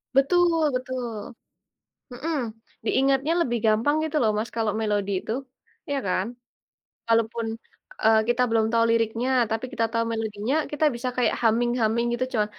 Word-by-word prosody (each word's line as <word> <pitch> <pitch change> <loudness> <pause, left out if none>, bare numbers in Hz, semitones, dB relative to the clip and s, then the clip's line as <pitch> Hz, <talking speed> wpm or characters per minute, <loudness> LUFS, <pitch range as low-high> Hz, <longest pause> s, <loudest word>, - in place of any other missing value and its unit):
Betul 330 +2 +4
betul. 250 -3 -4 0.8
Mhm, 320 +6 -3 0.5
diingatnya 270 +5 +2
lebih 240 -6 0
gampang 225 +7 +3
gitu 315 0 -3
loh 220 - +3
Mas, 220 +2 -2
kalau 220 -2 +1
melodi 205 -2 0
itu, 220 - -6 0.6
iya 285 - 0
kan? 185 +2 0 0.8
Kalaupun, 230 0 +1 0.6
eee, 220 0 +5
kita 240 +1 +2
belum 225 -1 +3
tahu 230 0 +4
liriknya 230 +2 +1 0.2
tapi 225 +2 -2
kita 230 -4 0
tahu 230 0 +1
melodinya, 220 +2 -2 0.2
kita 295 +1 0
bisa 245 +2 -3
kayak 250 - +2
humming-humming 235 0 +2
gitu, 245 +2 0
cuma 215 -4 +2
235 Hz, 145 wpm, -25 LUFS, 220-260 Hz, 0.8 s, eee